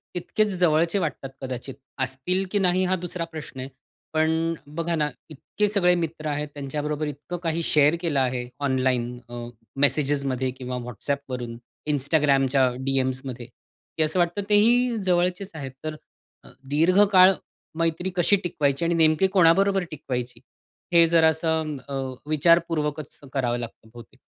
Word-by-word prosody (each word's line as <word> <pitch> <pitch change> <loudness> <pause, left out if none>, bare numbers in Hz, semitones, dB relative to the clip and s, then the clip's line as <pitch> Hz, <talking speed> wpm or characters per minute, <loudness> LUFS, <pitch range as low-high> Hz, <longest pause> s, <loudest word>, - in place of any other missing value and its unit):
तितकेच 215 +4 0
जवळचे 170 +2 +3
वाटतात 150 -5 -3
कदाचित, 130 0 -6 0.2
असतील 130 +9 -1
की 205 - +1
नाही 185 -1 +2
हा 185 +1 +1
दुसरा 175 -1 -4
प्रश्न 155 -5 -9
आहे. 130 +1 -5 0.4
पण 160 0 +2 0.3
अ, - - -25
बघा 170 +2 -2
ना 150 -2 0 0.2
इतके 160 +7 -2
सगळे 195 -4 +3
मित्र 165 -2 -4
आहेत, 150 0 -2
त्यांच्याबरोबर 150 +2 -3
इतकं 150 +5 -6
काही 165 0 0
शेअर 150 0 +4
केलं 160 -6 0
आहे, 125 -1 -1
ऑनलाईन 130 -3 0
अ, 120 0 -6 0.3
मेसेजमध्ये 140 -2 +1
किंवा 125 -1 -4
WhatsAppवरून 125 -1 -4 0.3
Instagramच्या 135 -2 +3 0.2
डीएम्समध्ये 130 -2 -2
की 160 - -7
असं 155 +4 0
वाटतं 175 +3 +1
तेही 235 +3 +4
जवळचेच 180 +2 0
आहेत. 140 -4 -6
तर 155 0 -4 0.5
अ, - - -15 0.2
दीर्घकाळ 185 +5 +5 0.5
मैत्री 165 +2 0
कशी 180 +3 +4
टिकवायची 145 -3 0
आणि 170 - +1
नेमकी 160 +3 +4
कोणाबरोबर 195 +2 +4
टिकवायची? 125 -5 -5 0.5
हे 170 -1 +7
जरा 165 -1 +5
असं 160 -1 -1
अ, - - -5 0.4
विचारपूर्वकच 155 -2 +1 0.2
करावं 120 -3 0
लागतं 115 -2 -8
बहुतेक. 120 -1 -14
155 Hz, 140 wpm, -25 LUFS, 135-175 Hz, 0.5 s, हे